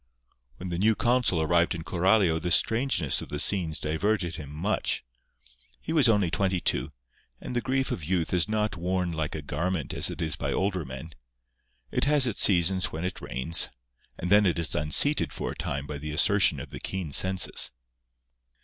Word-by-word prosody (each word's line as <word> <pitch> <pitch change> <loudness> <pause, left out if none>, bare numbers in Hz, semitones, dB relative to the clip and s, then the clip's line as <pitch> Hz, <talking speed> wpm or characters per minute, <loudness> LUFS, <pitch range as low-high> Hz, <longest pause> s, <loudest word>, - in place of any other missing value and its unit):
When 90 - -7
the 85 0 -3
new 110 +3 +3
consul 120 -10 +1
arrived 85 +1 +1
in 80 - -7
Coralio 90 0 +2
the 90 - -3
strangeness 110 - +2
of - - -9
the 75 - -4
scenes 85 -5 +1
diverted 85 +2 -1
him 75 -3 -9
much. 85 +9 -1 0.8
He 160 - -5
was 145 -7 +4
only 100 -6 +2
twenty 95 -1 0
two; 80 - -1 0.5
and - - -7
the 120 - 0
grief 135 +1 -1
of 80 - -4
youth 85 +1 -1
is 90 +3 +2
not 105 -2 -1
worn 90 +1 -2
like 80 -2 -3
a 75 - -6
garment 80 +2 -3
as - - +3
it - - -8
is 80 -1 -2
by - - -4
older 95 -4 -1
men. 65 +5 -9 0.8
It - - +1
has 145 -2 +4
its 120 -5 0
seasons 95 -1 +4
when 80 +3 -5
it 90 - -5
reigns; 65 +6 0 0.5
and 90 - -5
then 105 0 +5
it 85 - 0
is 85 -2 -1
unseated 75 - +2
for - - -4
a - - -8
time 70 +1 -4
by 70 0 -7
the 75 +1 -6
assertion 100 +4 +3
of - - -9
the - - -8
keen 95 -6 -4
senses. 95 +5 +3
90 Hz, 190 wpm, -26 LUFS, 80-100 Hz, 0.8 s, then